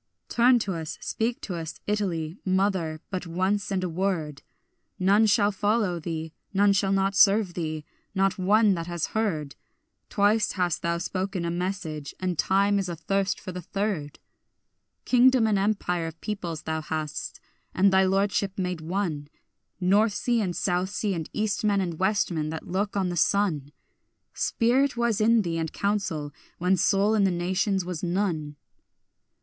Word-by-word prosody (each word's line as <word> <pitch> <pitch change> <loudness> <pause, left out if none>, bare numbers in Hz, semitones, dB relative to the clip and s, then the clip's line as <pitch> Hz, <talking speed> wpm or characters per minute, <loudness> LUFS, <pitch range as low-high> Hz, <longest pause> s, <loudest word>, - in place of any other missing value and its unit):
Turn 245 +1 +5
to 205 -4 -2
us, 160 -2 -5
speak 230 +2 -2
to 190 - -5
us, 165 -1 -6
Italy, 180 -6 -1
mother, 185 -5 0
but 185 -2 -3
once 190 +4 0
and 190 -1 0
a - - 0
word, 165 -4 -2 0.6
None 200 +3 +4
shall 205 0 +4
not 195 - -18
follow 205 -4 +1
thee, 160 -1 -5 0.2
none 200 +1 +5
shall 195 0 +1
not 195 0 +2
serve 200 -2 +4
thee, 155 -3 -4 0.3
not 195 0 +1
one 205 +2 +4
that 165 -2 -4
has 175 -2 -2
heard; 165 -10 -1 0.5
Twice 210 0 +2
hast 180 -4 0
thou 170 0 0
spoken 185 +1 -3
a 170 - -1
message, 175 -5 -4
and 180 -4 -2
time 200 +3 +3
is 190 -2 -2
athirst 195 +4 -1
for 185 - -7
the 180 0 -6
third. 185 -6 -3 0.9
Kingdom 255 -1 +5
and 210 -3 +2
empire 185 -4 0
of 165 0 -9
peoples 175 -7 -4
thou 160 0 -2
hadst, 155 -1 -4 0.3
and 195 +1 +3
thy 190 0 +5
lordship 195 0 +1
made 180 -3 -2
one 165 -4 -2 0.5
North 200 +4 +3
sea 240 +1 +1
and 180 -4 -2
south 180 0 0
sea 205 0 -1
and 165 -3 -4
east 215 0 -1
men 205 -2 +2
and 175 -4 -3
west 200 +1 +1
men 155 -2 -2
that 160 0 -6
look 200 +2 -1
on 190 -2 +1
the 175 - -3
sun; 160 -7 +1 0.6
Spirit 250 +3 +1
was 235 -3 +1
in 225 0 +4
thee 165 -2 -2
and 160 -1 -2
counsel, 180 -8 -2 0.2
when 180 +2 +2
soul 200 +3 +2
in 215 -2 +3
the 195 - +4
nations 185 +2 0
was 180 -3 -4
none. 170 -5 -1
190 Hz, 165 wpm, -26 LUFS, 170-205 Hz, 0.9 s, Turn